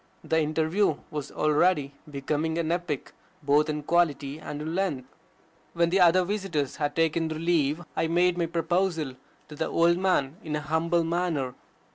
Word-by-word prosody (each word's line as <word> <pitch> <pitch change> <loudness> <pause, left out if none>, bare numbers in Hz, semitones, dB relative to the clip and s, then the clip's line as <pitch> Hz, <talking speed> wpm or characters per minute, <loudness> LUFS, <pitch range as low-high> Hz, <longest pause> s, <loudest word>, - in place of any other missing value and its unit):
The 160 - +1
interview 160 +4 +1 0.2
was 150 -2 -5
already 150 -1 +2 0.2
becoming 150 +3 -2
an 165 -1 0
epic, 175 -5 -3 0.3
both 145 +2 +3
in 150 -1 -2
quality 150 -3 +1
and 150 - -6
in 155 +2 -4
length. 175 -9 -1 0.7
When 170 0 +2
the 195 - +3
other 180 +1 +6
visitors 185 -8 -2
had 145 -1 -1
taken 165 0 +1
their 155 -1 -4
leave, 165 -1 +1
I 165 - +1
made 175 +2 +3
my 170 -1 0
proposal 165 -3 0 0.3
to 150 - -10
the 160 +2 -2
old 170 +1 +3
man 170 -6 +1
in 155 -2 -3
a 150 - -2
humble 165 +3 +1
manner. 165 -6 -1
160 Hz, 165 wpm, -27 LUFS, 150-175 Hz, 0.7 s, other